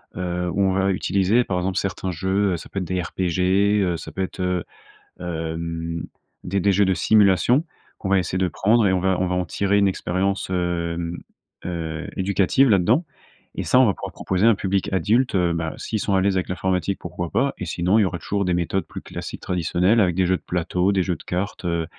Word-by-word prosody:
heu, 90 0 -2
où 100 - 0
on 95 -1 +3
va 95 +1 +2
utiliser 100 +5 +2
par 90 - -2
exemple 90 +1 -1
certains 95 -1 -3
jeux, 95 +3 0
heu, - - -1
ça - - -11
peut - - -9
être 90 - -3
des 90 +1 -1
RPG, 95 +4 +1
heu, - - -3
ça - - -9
peut 95 - -4
être, 95 - -4
heu, 90 -2 0 0.6
hem, 85 0 -4 0.4
des 100 +2 -1
des 100 +1 +2
jeux 100 +2 +4
de 95 - +2
simulation 105 - +4 0.3
qu'on 95 - -4
va 100 -1 +4
essayer 90 +1 -2
de 95 -1 +1
prendre 110 +5 +2
et 95 - +3
on 95 - +2
va 95 0 +1
on 95 - +1
va 90 - -1
en 90 0 0
tirer 100 +4 0
une 100 - +4
expérience, 95 +1 -1
hem, 85 -1 -2 0.5
heu, 80 -2 -4
éducative 100 +7 +3
là-dedans 110 - +3 0.5
et - - -2
ça 125 - +4
on 130 - +7
va 100 - +2
pouvoir - - -7
proposer 95 +4 +1
à - - +8
un 115 - +4
public 95 0 -1
adulte, 110 +7 +2
heu, 90 -2 +2
bah, 80 -1 -3
s'ils 110 - -3
sont 100 -1 0
à 95 - +3
l'aise 95 0 +2
avec 90 - -2
l'informatique 95 +1 -1
pourquoi 90 -1 -5
pas? 140 +2 +1
Et 90 - -3
sinon 90 +5 +1
il - - +5
y 100 - +3
aura 90 -1 -2
toujours 100 -1 -2
des 90 -1 +1
méthodes 90 +2 -1
plus - - -8
classiques - - -7
traditionnelles 90 +4 +1
avec 90 -3 +2
des 95 - +2
jeux 95 +1 +2
de - - -23
plateau, 90 +2 0
des 95 -2 +2
jeux 90 -2 -1
de - - -13
cartes, 95 +1 -4
heu, 85 -1 0
95 Hz, 230 wpm, -23 LUFS, 90-100 Hz, 0.6 s, à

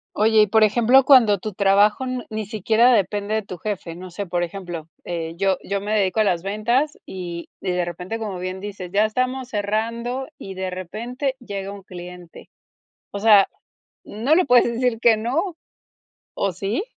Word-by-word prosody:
Oye, 220 0 +4
y - - +1
por 220 +2 +4
ejemplo, 240 +5 +5
cuando 230 -8 +6
tu 215 +2 -5
trabajo 205 +4 +3
n 255 -2 -3
ni 215 0 -4
siquiera 220 +4 +3
depende 205 0 0
de 220 - +1
tu 190 -3 -8
jefe. 180 -3 -5
No 180 +1 -9
sé, 200 +2 -5
por 175 0 -1
ejemplo, 175 -3 -6 0.2
eh, 165 -2 -4
yo 195 -1 +1
yo 200 0 -2
me 210 +1 -4
dedico 195 +1 +1
a 215 - +5
las 180 -3 0
ventas 235 +9 0
y 175 -2 -7
y 185 - -1
de 180 0 0
repente, 180 +6 -5
como 205 -4 -4
bien 185 +1 -5
dices, 195 -3 -7
ya 210 +2 +4
estamos 255 +3 -2
cerrando 230 +5 -2
y 195 - -8
de 190 0 -4
repente 235 - -4
llega 200 -5 -6
un 200 -1 -9
cliente. 180 -2 -11 0.6
O 200 - -6
sea, 205 -2 +6 0.6
no 240 +9 +1
le 365 - +3
puedes 245 -2 +6
decir 240 -1 0
que 230 -3 +5
no, 315 - -1 0.8
¿o 195 - -1
sí? 195 - -2
205 Hz, 185 wpm, -22 LUFS, 185-230 Hz, 0.8 s, cuando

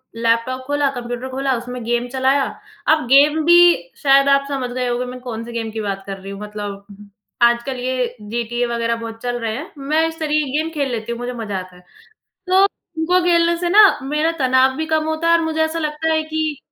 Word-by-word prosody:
Laptop 230 +3 0
खोला, 290 -1 +1
computer 245 0 -5
खोला, 265 0 -1
उसमें 245 0 -7
गेम 240 +1 0
चलाया। 265 +2 +2 0.4
अब 310 -3 +3
गेम 295 +4 +5
भी, 345 +1 +7 0.5
शायद 275 0 +5
आप 275 0 +3
समझ 265 -3 -3
गए 250 0 -2
होंगे, 245 +1 -1
मैं 250 0 -8
कौन-से 235 -1 -6
गेम 225 -1 -3
की 220 0 -4
बात 195 -1 -4
कर 195 0 -5
रही 195 +1 -9
हूँ। 200 - -8
मतलब 205 -1 -7 0.6
आजकल 240 +2 +2
ये 250 -1 -2
जीटीए 235 +3 -2
वगैरह 235 0 -1
बहुत 230 0 -8
चल 245 0 -2
रहे 225 -1 -3
हैं, 300 - -8
मैं 305 +4 +1
इस 325 0 -8
तरीके 305 -1 0
की 290 - 0
गेम 320 +1 -2
खेल 280 -4 -1
लेती 230 0 -4
हूँ, 235 - -5
मुझे 245 +1 -4
मज़ा 215 -5 -4
आता 185 0 -11
है। 180 - -17 0.7
तो 380 +1 +5
उनको 355 -2 -1
खेलने 340 -1 +3
से 350 0 -1
ना, 415 +3 +7 0.2
मेरा 300 +4 0
तनाव 260 0 +3
भी 315 0 -2
कम 315 -1 +1
होता 315 +1 -1
है 335 - +6
और 330 - -1
मुझे 320 0 -2
ऐसा 315 +1 -3
लगता 315 +1 -1
है 315 0 +1
कि 310 -2 -2
260 Hz, 220 wpm, -19 LUFS, 235-310 Hz, 0.7 s, भी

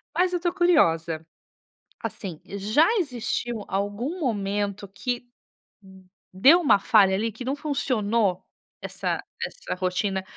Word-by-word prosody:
Mas 360 +1 +2
eu 355 - +2
estou 345 0 -1
curiosa. 165 - +2 0.8
Assim, 180 -6 -6
já 210 +10 +2
existiu 240 - -2
algum 205 - -2
momento 205 - -2
que, 245 +6 -4 0.6
hum, 190 -1 -17 0.3
deu 275 - +6
uma 280 - +5
falha 195 -2 +4
ali 225 +3 -1
que 235 +4 -8
não 270 +2 -1
funcionou 235 - 0 0.4
essa - - -3 0.2
essa - - -5
rotina 185 +1 -1
210 Hz, 120 wpm, -25 LUFS, 190-275 Hz, 0.8 s, deu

